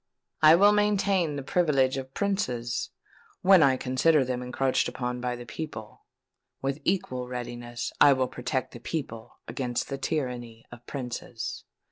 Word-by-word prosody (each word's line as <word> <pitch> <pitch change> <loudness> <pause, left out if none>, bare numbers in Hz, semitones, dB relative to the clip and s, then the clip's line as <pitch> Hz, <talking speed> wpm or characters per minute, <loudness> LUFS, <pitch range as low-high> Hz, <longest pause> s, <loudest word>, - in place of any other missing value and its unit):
I 155 +1 +8
will 200 +4 +6
maintain 200 -6 +2
the 140 - -4
privileges 135 -5 +2
of 130 0 -7
princes, 125 - -1 0.5
when 190 -2 +7
I 135 -3 +4
consider 130 +3 +2
them 125 0 -2
encroached 130 +1 0
upon 125 -1 -4
by 125 -1 -2
the 120 0 -9
people: 115 -4 -8 0.5
with 135 +2 -3
equal 130 -9 -1
readiness 120 -1 -5
will 135 -3 +6
I 130 - -4
protect 125 +1 -2
the 120 - -10
people 120 -5 -6
against 120 +1 -3
the 135 -1 -4
tyranny 125 -7 -3
of 120 0 -12
princes." 125 -3 -5
130 Hz, 145 wpm, -27 LUFS, 120-155 Hz, 0.5 s, I